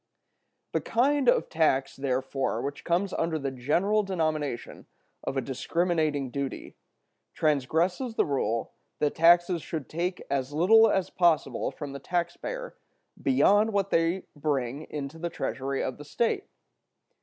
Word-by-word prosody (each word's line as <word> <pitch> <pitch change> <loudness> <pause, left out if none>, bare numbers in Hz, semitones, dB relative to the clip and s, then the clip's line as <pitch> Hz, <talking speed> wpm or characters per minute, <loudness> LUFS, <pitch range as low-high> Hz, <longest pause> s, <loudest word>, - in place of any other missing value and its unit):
The - - 0
kind 265 +2 +2
of - - +3
tax, 135 -4 +1
therefore, 135 0 -1
which 145 +1 -5
comes 185 +3 0
under 165 -1 0
the 140 -2 -3
general 170 +12 +1
denomination 155 - -3 0.4
of 135 - -3
a - - +2
discriminating 155 -1 -1
duty, 140 0 -5 0.6
transgresses 165 - +1
the - - +3
rule 115 -6 -1 0.3
that 150 - +1
taxes 175 +1 +5
should 150 -1 -5
take 175 +3 -3
as 140 0 -2
little 220 +8 +6
as 190 -2 0
possible 170 -4 +2
from 145 -2 -7
the 140 - -6
taxpayer 180 - -3 0.5
beyond 220 -6 +4
what 200 -1 0
they 165 +3 +2
bring 145 -1 -2
into 150 +1 -6
the 170 +1 -2
treasury 135 -5 -3
of 130 - -4
the - - -7
state. 235 - -1
160 Hz, 135 wpm, -28 LUFS, 140-185 Hz, 0.6 s, little